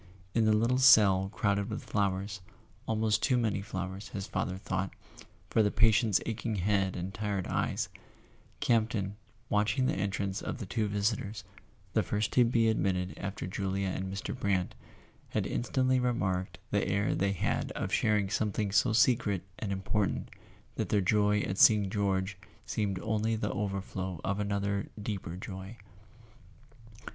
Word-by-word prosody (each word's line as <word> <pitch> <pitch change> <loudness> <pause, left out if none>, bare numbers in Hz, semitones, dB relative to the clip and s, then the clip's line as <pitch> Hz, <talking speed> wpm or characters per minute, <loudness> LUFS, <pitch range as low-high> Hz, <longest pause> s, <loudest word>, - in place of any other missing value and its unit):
In 115 -1 +3
the 110 - +4
little 115 +4 +2
cell 100 -7 +6
crowded 100 -2 0
with - - -4
flowers—almost 100 +2 -2
too 130 -3 +3
many 110 -5 0
flowers, 95 0 -5
his 95 -2 -5
father 95 -2 -2
thought, 95 0 -2 0.6
for 110 - +4
the 105 - +3
patient's 110 -1 +4
aching 115 -1 -2
head 95 0 +1
and 90 +2 -4
tired 100 -3 -2
eyes—Campton, 110 -4 -2 0.3
watching 105 +5 +2
the - - +1
entrance 100 0 -2
of - - -4
the 110 - -5
two 105 +2 -1
vis¬ 105 +2 +1
itors, 105 0 -7 0.5
the - - +3
first 105 +1 -1
to 125 - +6
be 115 -1 +3
admitted 95 -4 0
after 100 0 -5
Julia 95 +1 -2
and 95 +1 -3
Mr. 100 +4 -4
Brant, 100 -7 0 0.6
had - - -1
instantly 130 +1 +1
remarked 95 -7 -1
the - - +1
air 100 +2 +1
they 100 0 +1
had 90 - -1
of - - -3
shar¬ 105 -1 +3
ing 95 -1 -4
something 105 -1 0
so 110 +3 +3
secret 115 -6 +3 0.2
and 105 -3 -3
important 95 +1 -1 0.5
that - - -1
their 105 - +3
joy 105 +2 +3
at 95 0 -3
seeing 105 -3 +6
George 95 -2 0 0.3
seemed 100 -3 -1
only 110 +1 0
the 105 -1 -2
overflow 95 -3 -3
of 100 +1 -1
another 100 -1 -1
deeper 100 -5 -4
joy. 95 +3 -7
100 Hz, 150 wpm, -31 LUFS, 95-110 Hz, 0.6 s, cell